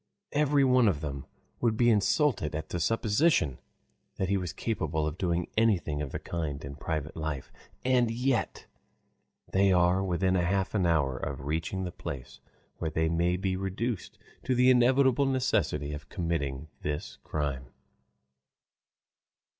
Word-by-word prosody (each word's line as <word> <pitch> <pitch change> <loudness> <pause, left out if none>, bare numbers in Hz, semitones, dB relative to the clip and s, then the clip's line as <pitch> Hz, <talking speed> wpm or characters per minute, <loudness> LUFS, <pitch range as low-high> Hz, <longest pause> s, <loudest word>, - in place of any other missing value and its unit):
Every 145 -1 +3
one 125 -3 +5
of 80 -8 +1
them 70 -3 -5 0.3
would 115 -2 +1
be 120 0 +5
insulted 105 - +2
at 80 - -4
the 85 - -2
supposition 105 - +2 0.6
that 95 - -2
he 100 - +2
was 90 -3 -2
capable 80 -9 -2
of 75 0 -2
doing 85 -1 0
anything 90 -10 +2
of 70 -3 -4
the - - -3
kind 75 -5 -4
in 70 0 -7
private 80 0 -4
life. 75 -5 -4 0.3
And 125 -2 +3
yet 125 0 -1 0.9
they 95 0 +4
are 90 +1 +3
within 95 0 +1
half 95 +2 +1
an 95 -5 +2
hour 70 -6 +2
of 70 +1 -5
reaching 80 +5 -2
the 90 - -4
place 65 -3 -7 0.4
where 80 - -2
they 80 +1 0
may 85 +2 +1
be 95 0 -1
reduced 95 +3 -3 0.3
to 130 - +1
the 125 +1 +6
inevitable 130 +2 +4
necessity 75 - 0
of 75 -1 -8
committing 80 -5 -2
this 75 0 -4
crime. 70 -4 -3
90 Hz, 145 wpm, -29 LUFS, 75-115 Hz, 0.9 s, the